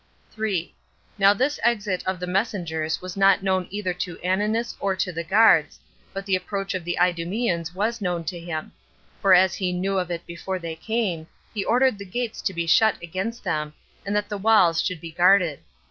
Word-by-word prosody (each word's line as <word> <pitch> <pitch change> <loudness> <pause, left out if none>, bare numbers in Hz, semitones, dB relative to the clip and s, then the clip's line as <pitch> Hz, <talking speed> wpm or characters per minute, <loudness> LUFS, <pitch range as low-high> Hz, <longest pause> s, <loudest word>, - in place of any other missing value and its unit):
3. 205 -6 -2 0.5
Now 195 0 +7
this 265 +8 0
exit 210 -5 +1
of 185 -1 -1
the 180 - -3
messengers 180 -5 -2
was 185 -1 -6
not 195 -1 +4
known 190 -2 0
either 200 -2 -2
to 175 -1 -5
Ananus 210 +5 0
or 195 -1 0
to 185 - -1
the 170 0 -4
guards, 215 +7 +4 0.3
but 195 0 -6
the 195 -1 +2
approach 195 +1 -3
of 185 -2 -3
the 175 +1 -3
Idumeans 175 0 0
was 225 +4 -1
known 175 -3 -1
to 175 +1 -5
him; 165 -2 -5 0.5
for 195 -2 +6
as 185 +1 +4
he 185 -2 -1
knew 190 +2 0
of 180 -1 -3
it 170 -1 -4
before 170 +2 -5
they 165 -2 -6
came, 185 -4 -2 0.3
he 205 -3 -2
ordered 250 -1 +2
the 200 - -7
gates 235 +4 -4
to 195 - -1
be 170 -2 -3
shut 215 +6 +4
against 190 +8 -5
them, 150 -5 -2 0.3
and 200 +1 -2
that 210 0 0
the 205 -1 -4
walls 190 -6 +4
should 180 -5 -3
be 165 - -8
guarded. 175 -2 +4
185 Hz, 195 wpm, -24 LUFS, 175-205 Hz, 0.5 s, Now